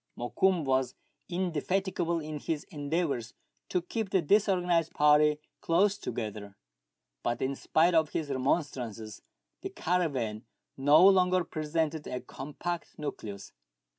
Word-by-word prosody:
Mokoum 175 Hz, +8 st, +1 dB
was 130 Hz, -1 st, +1 dB, 0.3 s
indefatigable 180 Hz, 0 st, -1 dB
in 155 Hz, -1 st, -5 dB
his 155 Hz, 0 st, -3 dB
endeavours 145 Hz, -6 st, -2 dB, 0.3 s
to 180 Hz, -2 st, 0 dB
keep 220 Hz, +2 st, -3 dB
the 190 Hz, -3 st, +2 dB
di^sorganized 180 Hz, -3 st, +2 dB
party 150 Hz, 0 st, +5 dB, 0.2 s
close 195 Hz, +5 st, +3 dB
together; 105 Hz, -, -6 dB, 0.6 s
but, 120 Hz, 0 st, -1 dB
in 135 Hz, +1 st, -1 dB
spite 160 Hz, +5 st, +2 dB
of 160 Hz, -2 st, +3 dB
his 150 Hz, -3 st, -3 dB
remonstrances, 125 Hz, -6 st, -2 dB, 0.4 s
the -, -, -4 dB
caravan 135 Hz, -11 st, -1 dB, 0.3 s
no 145 Hz, +7 st, +6 dB
longer 185 Hz, -2 st, +4 dB
presented 155 Hz, -1 st, -2 dB
a 125 Hz, -, -3 dB
compact 150 Hz, +7 st, -6 dB
nucleus. 105 Hz, -9 st, -6 dB
155 Hz, 115 wpm, -30 LUFS, 135-175 Hz, 0.6 s, no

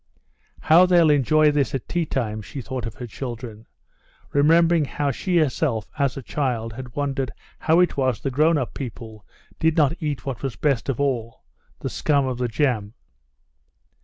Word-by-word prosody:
"How 170 Hz, +4 st, +6 dB
they'll 170 Hz, -4 st, +5 dB
enjoy 150 Hz, +2 st, +4 dB
this 145 Hz, -2 st, 0 dB
at 130 Hz, -, -5 dB
tea 170 Hz, -3 st, -1 dB
time!" 110 Hz, -6 st, -2 dB
she 135 Hz, -, -8 dB
thought 125 Hz, -1 st, -5 dB
of 110 Hz, -, -8 dB
her 125 Hz, -, -7 dB
children, 115 Hz, -2 st, -7 dB, 0.7 s
remembering 165 Hz, +2 st, +4 dB
how 140 Hz, 0 st, -1 dB
she 180 Hz, +7 st, -1 dB
herself 135 Hz, -7 st, 0 dB
as 140 Hz, -3 st, +1 dB
a 135 Hz, -, -6 dB
child 115 Hz, -5 st, -2 dB
had 125 Hz, +2 st, -9 dB
wondered 135 Hz, -2 st, -1 dB, 0.3 s
how 160 Hz, +2 st, +3 dB
it 180 Hz, -, +1 dB
was 130 Hz, -4 st, +1 dB
the 135 Hz, -, -3 dB
grown 155 Hz, +5 st, +3 dB
up 130 Hz, -5 st, -3 dB
people 110 Hz, -5 st, -8 dB, 0.3 s
did 160 Hz, 0 st, +2 dB
not 150 Hz, -2 st, +4 dB
eat 150 Hz, -3 st, -3 dB
what 135 Hz, -3 st, -4 dB
was 135 Hz, -4 st, -3 dB
best 140 Hz, -4 st, 0 dB
of 135 Hz, -, -1 dB
all—the 115 Hz, -, -4 dB
scum 140 Hz, -2 st, +1 dB
of 130 Hz, -2 st, -3 dB
the 125 Hz, -, 0 dB
jam. 115 Hz, -4 st, -1 dB
135 Hz, 170 wpm, -23 LUFS, 120-150 Hz, 0.7 s, How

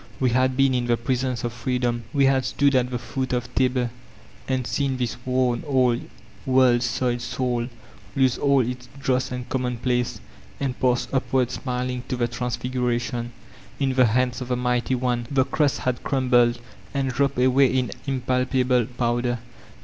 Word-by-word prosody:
We 130 Hz, -2 st, +2 dB
had 130 Hz, +1 st, +2 dB
been 135 Hz, -1 st, +4 dB
in 125 Hz, -1 st, 0 dB
the 120 Hz, -1 st, +2 dB
presence 125 Hz, +1 st, -1 dB
of 120 Hz, -1 st, -2 dB
Freedoml 120 Hz, 0 st, -1 dB
We 140 Hz, -2 st, +3 dB
had 135 Hz, -1 st, +3 dB
stood 140 Hz, +3 st, +2 dB
at 125 Hz, -1 st, +2 dB
the 125 Hz, -, -2 dB
foot 125 Hz, +2 st, -3 dB
of 125 Hz, 0 st, -2 dB
Tabor, 125 Hz, -2 st, +1 dB, 0.6 s
and 130 Hz, -2 st, 0 dB
seen 135 Hz, 0 st, -1 dB
this 125 Hz, -2 st, -2 dB
worn, 125 Hz, -2 st, +1 dB
old, 125 Hz, -3 st, +2 dB, 0.3 s
world 130 Hz, -2 st, +4 dB
soiled 120 Hz, 0 st, 0 dB
soul 120 Hz, -2 st, -1 dB, 0.5 s
lose 130 Hz, -2 st, +3 dB
all 140 Hz, -1 st, +4 dB
its 125 Hz, +1 st, -4 dB
dross 130 Hz, -1 st, 0 dB
and 125 Hz, -1 st, -5 dB
commonplace, 125 Hz, -1 st, -1 dB, 0.4 s
and 135 Hz, -2 st, -1 dB
pass 125 Hz, -1 st, +2 dB
iqmard 130 Hz, -2 st, +1 dB
snuHog, 125 Hz, -1 st, -3 dB
to -, -, -2 dB
the 120 Hz, -1 st, +1 dB
Trans 120 Hz, 0 st, -3 dB
figuratu>n. 120 Hz, -1 st, -2 dB, 0.5 s
In 135 Hz, -2 st, +1 dB
the 130 Hz, -2 st, +5 dB
hands 125 Hz, +2 st, +1 dB
of 125 Hz, -, -4 dB
the 125 Hz, -1 st, 0 dB
Mighty 125 Hz, +1 st, 0 dB
One 120 Hz, -1 st, -1 dB
the 135 Hz, -2 st, +2 dB
crust 145 Hz, -2 st, +1 dB
had 125 Hz, -1 st, -1 dB
crumbled, 120 Hz, -3 st, +2 dB, 0.4 s
and 135 Hz, -1 st, 0 dB
dropped 140 Hz, +1 st, 0 dB
away 130 Hz, +2 st, +5 dB
in 125 Hz, -4 st, 0 dB, 0.2 s
impalpable 125 Hz, -2 st, +1 dB
powder. 120 Hz, 0 st, -1 dB
125 Hz, 165 wpm, -24 LUFS, 120-130 Hz, 0.6 s, the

